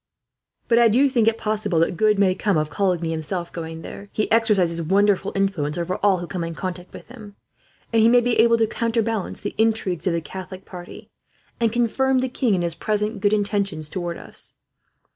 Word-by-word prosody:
"But 235 0 +4
I 235 - +6
do 250 +6 +4
think 240 -5 +1
it 225 0 +3
possible 215 -5 -1
that 165 +2 +2
good 210 +3 +3
may 195 -2 +3
come 195 -1 0
of 155 0 -1
Coligny, 180 -5 0
himself, 165 +2 -3
going 165 -1 -7
there. 200 0 -9
He 215 - -2
exercises 200 -7 +3
wonderful 195 +3 +2
influence 185 -7 -1
over 175 +2 -2
all 200 -2 +4
who 175 - -5
come 175 0 -4
in 165 0 -5
contact 180 0 -6
with - - -12
him, 215 -5 -12 0.6
and 225 - +4
he 220 - +6
may 245 +1 +6
be 240 -1 0
able 230 +1 +5
to 225 - +3
counterbalance 225 -2 -2
the - - -4
intrigues 220 -6 +1
of 180 - +2
the 170 - 0
Catholic 185 +3 -9
party, 175 -2 -11 0.5
and 230 -2 +2
confirm 250 +3 +1
the 260 0 0
king 240 -4 +1
in 175 - -1
his 170 -1 -1
present 210 +3 -2
good 205 +1 +2
intentions 200 -7 -1
towards 175 0 -4
us." - - -8
200 Hz, 200 wpm, -22 LUFS, 175-225 Hz, 0.6 s, I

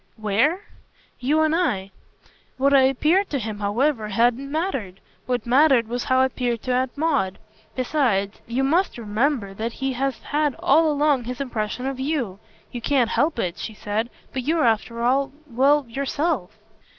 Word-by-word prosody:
"'Where' 230 - +1 0.3
?" - - -34
"You 310 +2 +4
and 315 0 +2
I. 200 - 0 0.7
What 275 +2 +3
I 275 - +7
appeared 305 +9 +2
to 285 - -1
him, 215 -4 -5
however, 220 +3 0
hadn't 240 +6 +1
mattered. 270 - -3 0.3
What 245 -3 -1
mattered 260 -1 +4
was 240 +1 -3
how 260 0 +3
I - - +5
appeared 245 -3 -2
to 255 - -1
Aunt 255 +2 -1
Maud. 285 - 0 0.4
Besides, 245 -7 0
you 245 +3 -1
must 335 +6 +1
remember 220 -1 -1
that 225 +4 -4
he 270 0 -2
has 265 -1 -1
had 295 -2 0
all 315 +3 +4
along 290 -4 +2
his 250 +1 -5
impression 250 -2 -3
of 270 -1 -3
YOU. 265 -9 -2 0.3
You 240 - -6
can't 245 -2 +2
help 300 -1 +1
it," 180 -5 -2
she 220 - -6
said, 215 +3 -2 0.2
"but 260 - -2
you're 315 +2 +1
after 230 +1 0
all 270 +3 +2
well, 280 +2 +3
yourself." 280 - -2
255 Hz, 170 wpm, -23 LUFS, 230-290 Hz, 0.7 s, I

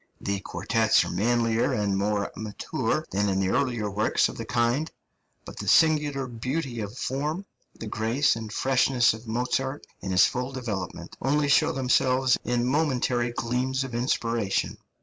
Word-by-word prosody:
The 100 0 -2
quartets 110 +2 +1
are - - -5
manlier 115 +1 +1
and 100 -2 0
more 100 +1 0
mature 110 -2 -2
than 100 +1 +1
in 95 0 0
the 95 -1 +1
earlier 120 -4 0
works 105 +2 +2
of - - -8
the 115 - -6
kind; 120 +7 0 0.6
but - - -10
the - - -6
singular 150 -4 +3
beauty 125 +2 -4
of 105 +3 -5
form, 150 +10 -2 0.3
the - - -6
grace 115 +6 +1
and 110 -2 -6
freshness 130 -1 +3
of 110 +1 -10
Mozart 130 +4 -2
in 95 - -6
his 90 -1 +5
full 125 +1 -2
development, 105 -8 -5
only 145 +2 +1
show 140 - +4
themselves 130 0 +2
in 120 0 0
momentary 130 -4 +1
gleams 125 +3 -1
of 135 -2 -7
inspiration. 115 -3 -1
120 Hz, 155 wpm, -26 LUFS, 110-130 Hz, 0.6 s, his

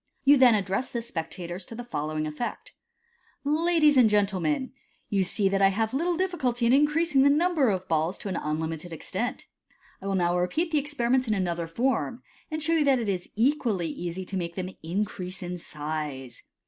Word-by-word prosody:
You 285 +1 +7
then 255 -4 +6
address 195 +4 -1
the 235 - -3
spectators 175 -3 -5
to 230 - -8
the 245 - -6
following 155 -8 -3
effect: 155 +11 -5 0.3
— 470 0 -40
" - - -42
Ladies 305 0 +3
and 240 -4 +7
gentle 205 -2 +2
men, 170 - -1 0.4
you 195 -2 +2
see 195 +2 +1
that 195 0 +1
I 195 - +7
have 220 +4 0
little 335 +5 0
difficulty 265 -11 0
in 235 - +4
increasing 295 +1 +3
the 280 - +6
number 310 -3 +3
of 190 -3 0
the - - -26
balls 160 +3 0
to - - -7
an 190 - -2
unlimited 160 +2 -3
extent. 230 - -3 0.6
I 195 - -6
will 195 - 0
now 175 -2 +2
rvueat 275 - 0
the 305 - +3
experiment 260 -3 0
in 215 - +1
another 170 -3 -1
form, 240 +5 -1 0.3
and 310 -1 -2
show 325 +2 +3
you 315 -3 +3
that 275 -2 +4
it 230 -4 -2
is 185 -2 -3
equal 245 -2 +2
lv 175 - -3
easy 175 +2 -5
to 195 - -4
make 170 -2 -4
them 185 0 -4
increase 185 +1 -3
in 180 0 -5
size. 150 -6 -5
210 Hz, 205 wpm, -27 LUFS, 175-275 Hz, 0.6 s, You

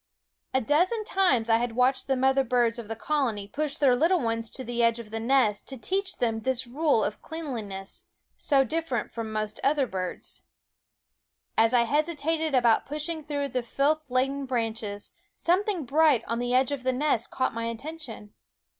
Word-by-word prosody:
A 260 - +2
dozen 355 - +2
times 370 - +2
I 225 -1 +4
had 240 0 -2
watched 255 +2 +2
the 270 -1 +1
mother 265 +1 +3
birds 240 -2 +1
of 230 - -7
the 225 - -4
colony 230 -6 -1
push 290 +5 -2
their 265 -4 +4
little 335 +7 +3
ones 230 -3 -1
to 260 - -6
the 240 -1 -2
edge 230 0 +3
of 225 -3 -9
the 225 - -3
nest 230 -4 +2
to 265 - -5
teach 380 +8 -2
them 225 -2 0
this 260 +2 -1
rule 280 -1 +1
of 210 - -3
cleanliness, 225 -12 -6 0.3
so 275 -3 +3
differ 320 +1 -2
ent - - -2
from 225 -2 -5
most 215 -1 -3
other 280 0 +3
birds. 185 -5 -5 1.1
As 225 0 +4
I 245 -2 +4
hesitated 310 +3 0
about 235 -3 +3
pushing 305 +3 -3
through 285 -1 -2
the 250 0 -1
filth 285 +6 0
laden 270 +2 0
branches, 225 -4 -3 0.3
something 365 -2 +1
bright 295 -1 +4
on 230 +1 -2
the 245 0 -2
edge 255 +2 +3
of 285 -2 -2
the 260 0 0
nest 260 -3 0
caught 260 - -1
my 230 0 -3
attention. 230 -3 -7
255 Hz, 180 wpm, -27 LUFS, 230-300 Hz, 1.1 s, I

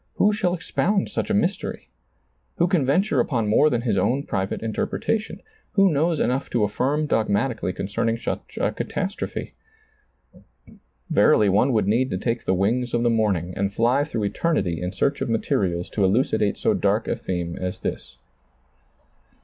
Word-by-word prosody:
Who 210 +1 +3
shall 185 -4 0
expound 195 +3 0
such - - -2
a - - +1
mystery? 200 -2 -1 0.7
Who 170 - +3
can 170 -8 +1
venture 150 0 +2
upon 120 -3 0
more 145 +8 +4
than 120 -4 0
his 105 -6 +1
own 130 +9 +1
private 95 -3 -3
interpretation? 210 - -2 0.3
Who 195 -2 +4
knows 160 +2 +1
enough 130 +3 0
to 120 - +1
affirm 135 +9 0
dogmatically 110 -4 0
concerning 110 +5 -1
such - - -5
a - - +1
catastrophe? 195 +2 -4 1.6
Verily 110 -9 +4
one 105 +8 +3
would 105 -4 +1
need 120 +5 +2
to 95 - -2
take 115 +4 -2
the 95 - +2
wings 120 +6 0
of 120 - +1
the 120 - +3
morning 100 -6 0
and 100 0 -1
fly 120 +7 +2
through 110 -9 -2
eter 165 +10 0
nity 85 - -1
in 90 0 -3
search 140 +9 -1
of - - -1
materials 90 -6 0
to 100 - 0
elucidate 105 0 +2
so - - +1
dark - - +1
a - - 0
theme 85 -2 -4
as 90 0 -4
this. 65 +2 -5
115 Hz, 165 wpm, -23 LUFS, 100-150 Hz, 1.6 s, more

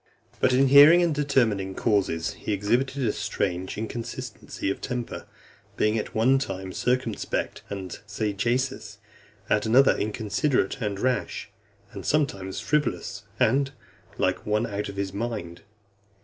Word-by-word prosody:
XV. - - -26
But - - +4
in 135 +1 +4
hearing 150 +6 +9
and 170 -2 +2
determining 115 -10 +1
causes, 95 -7 0
he 105 - -3
exhibited 125 +7 0
a 105 - +1
strange 90 +1 -2
inconsistency 110 -3 -4
of - - -5
temper, 125 -2 -4 0.5
being 105 +1 +2
at 110 - -3
one 130 +5 +4
time 95 -6 -5
circumspect 125 -3 -1
and 95 -3 -6
sagacious, 120 +6 -1 0.5
at 105 +1 +1
another 130 +5 +6
inconsiderate 110 +3 0
and 100 -3 -2
rash, 125 +2 -1 0.4
and - - -8
sometimes 100 -11 0
frivolous, 110 - -1
and 135 +1 +2 0.4
like - - 0
one 105 +2 +1
out 105 -2 -3
of 100 - -8
his 100 -1 -3
mind. 105 -6 -4
110 Hz, 135 wpm, -26 LUFS, 100-130 Hz, 0.5 s, hearing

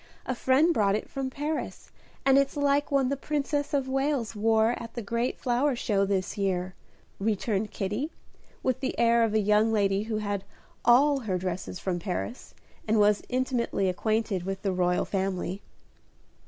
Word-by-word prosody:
A 255 - -1
friend 265 +7 +3
brought 200 -6 +2
it 215 - -5
from 270 -1 -3
Paris, 295 +3 -4 0.3
and 270 0 +6
it's 275 +1 0
like 285 0 +2
one 275 -2 +2
the 280 - 0
Princess 290 +1 -2
of 275 -3 0
Wales 270 -4 -1
wore 220 +1 +3
at 230 0 -9
the 240 - -3
great 235 +4 -1
flower 255 +2 +1
show 200 -4 +1
this 195 0 -2
year," 185 -2 -1 0.5
returned 210 0 0
Kitty, 210 - -3 0.5
with 260 0 0
the 265 0 -3
air 235 0 +4
of 220 -1 0
a - - +5
young 210 +2 +3
lady 200 -2 +2
who 220 -1 -2
had 205 -2 -2 0.4
all 275 +4 +5
her 205 -7 -2
dresses 185 0 -4
from 180 -2 -2
Paris, 200 +6 -5 0.3
and 220 +1 +3
was 210 0 +4
intimately 250 -6 0
acquainted 215 +1 0
with 195 +2 -5
the 195 -2 0
royal 180 -1 +1
family. 190 -1 -2
225 Hz, 170 wpm, -27 LUFS, 195-265 Hz, 0.5 s, and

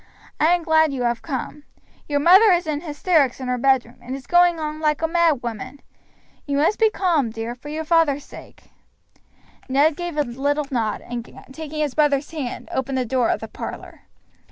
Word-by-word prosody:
I 310 - +4
am 350 - -4
glad 315 -1 +3
you 260 -3 -3
have 235 -1 0
come. 290 0 -5 0.5
Your 285 -1 +1
mother 380 +8 +7
is 350 -1 +2
in 300 -1 -2
hysterics 300 -4 +1
in 260 - -5
her 250 0 -1
bedroom, 265 -1 +1
and 250 +2 -6
is 270 -2 -9
going 350 +1 +4
on 305 0 -4
like 305 0 0
a - - +3
mad 330 -6 +2
woman. 240 +4 -6 0.7
You 280 0 0
must 315 +8 +2
be 445 -1 +5
calm, 340 - +1
dear, 225 +1 -5
for 255 +4 -11
your 310 +1 -4
father's 305 -3 +2
sake." - - -14 1.0
Ned 285 +4 +3
gave 345 -2 -5
a 295 - +3
little 285 +4 -1
nod, 225 -4 -1
and, 240 -1 -6 0.3
taking 310 0 -5
his 295 -4 -1
brother's 295 -2 +1
hand, 285 -7 -5
opened 265 0 -2
the 255 - 0
door 250 0 +1
of - - 0
the - - -6
parlor. - - -8
290 Hz, 195 wpm, -22 LUFS, 260-320 Hz, 1.0 s, mother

